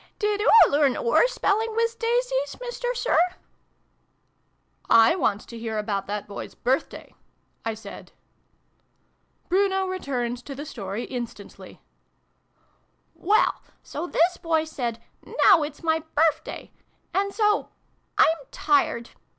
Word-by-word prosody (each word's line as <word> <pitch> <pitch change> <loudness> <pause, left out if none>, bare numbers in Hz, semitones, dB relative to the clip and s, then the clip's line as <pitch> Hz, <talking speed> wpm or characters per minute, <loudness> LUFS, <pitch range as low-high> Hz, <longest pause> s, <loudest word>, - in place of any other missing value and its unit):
Did 420 -1 0
oo 450 +1 +7
learn 285 -2 +3
oor 485 0 +3
spelling 445 -2 0
wiz 460 0 +1
daisies, - - -1
Mister - - -3
Sir? 485 -8 +2 0.6
" - - -45 0.3
" - - -36 0.2
I - - +2
want 230 - 0
to 235 - -10
hear 225 -1 -4
about 205 -2 -2
that 205 0 -4
Boy's 200 - -8
Birthday'' 260 +3 -2 0.5
I 225 -1 -2
said. 210 -2 -11 1.4
Bruno 385 +1 +2
returned 250 -10 -3
to 275 - -7
the 290 +3 -7
story 210 -5 -5
instantly. 235 -5 -8 0.7
" 355 - -18
Well, 425 - +3 0.2
so 350 - -5
this 350 +1 +2
Boy 325 -2 0
said 245 -7 -4 0.5
'Now 370 -5 +7
it's 295 +2 -5
my 320 -1 +2 0.2
Birth 315 +1 +3
day! - - -8 0.2
' - - -42
And 400 +1 0
so 420 0 +1 0.5
I'm 325 - +5
tired 320 -11 +1
320 Hz, 135 wpm, -25 LUFS, -, 1.4 s, oo